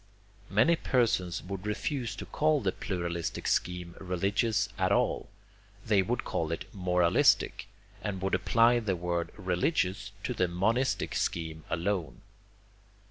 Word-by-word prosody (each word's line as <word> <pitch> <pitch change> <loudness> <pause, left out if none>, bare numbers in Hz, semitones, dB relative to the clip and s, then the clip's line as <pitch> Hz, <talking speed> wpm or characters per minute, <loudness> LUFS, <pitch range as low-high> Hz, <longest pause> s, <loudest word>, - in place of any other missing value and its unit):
Many 115 +12 +4
persons 115 - +1
would 95 +2 -6
refuse 115 +1 -2
to - - -7
call 155 0 +2
the 100 -7 0
pluralistic 85 -5 -3
scheme 90 -1 -1
religious 100 +3 0
at 95 -1 +2
all. - - +1 0.6
They 105 -3 +4
would 120 +6 -1
call 80 -1 -2
it 85 - -3
moralistic, 90 -3 +3 0.3
and 100 -3 -3
would 95 - -1
apply 115 +6 +4
the 105 -5 -1
word 85 -1 -2
religious 95 - 0
to 125 - -1
the 95 -5 +1
monistic 115 +9 0
scheme 80 -2 -2
alone. 85 +1 -2
95 Hz, 130 wpm, -30 LUFS, 90-110 Hz, 0.6 s, Many